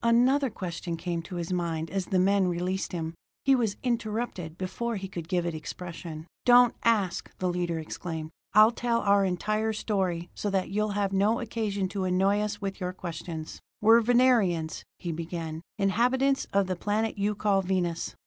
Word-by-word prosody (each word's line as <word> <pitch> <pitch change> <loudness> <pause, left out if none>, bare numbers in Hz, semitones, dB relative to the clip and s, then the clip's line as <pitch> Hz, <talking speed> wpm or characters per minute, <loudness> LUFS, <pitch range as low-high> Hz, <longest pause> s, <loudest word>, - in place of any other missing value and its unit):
Another 250 +4 +4
question 175 -4 -5
came 170 0 -2
to 165 +2 -8
his 175 +1 -3
mind 165 -2 -2
as 195 -2 -2
the 190 - +1
men 195 +1 +3
released 180 +2 -1
him. 165 -3 -3 0.3
He 275 - +6
was 230 -6 +1
interrupted 220 -8 -2
before 210 +6 -3
he 195 -1 -4
could 170 -4 -7
give 175 0 0
it 170 - -1
expression. 160 0 -7 0.2
"Don't 245 -1 +7
ask," 210 -6 +1
the 185 - -1
leader 175 -1 -1
exclaimed. 160 0 -5 0.2
"I'll 215 +2 +8
tell 235 -1 0
our 200 0 +4
entire 215 +4 0
story 185 -5 -1
so 205 - -3
that 190 -2 -1
you'll 210 +1 0
have 200 -1 0
no 205 +4 +3
occasion 215 -4 -2
to 195 -1 -2
annoy 190 +3 +2
us 210 0 -2
with 195 -1 -4
your 180 0 -2
questions. 165 -3 -6 0.2
"We're 225 +2 +6
Venerians," 225 -10 +3
he 170 - -4
began, 165 -1 -5 0.2
"inhabitants 250 +7 +2
of 200 0 +3
the 185 0 -2
planet 210 +3 -1
you 205 +1 +1
call 200 -1 +2
Venus. 180 -3 -1
195 Hz, 175 wpm, -28 LUFS, 175-215 Hz, 0.3 s, I'll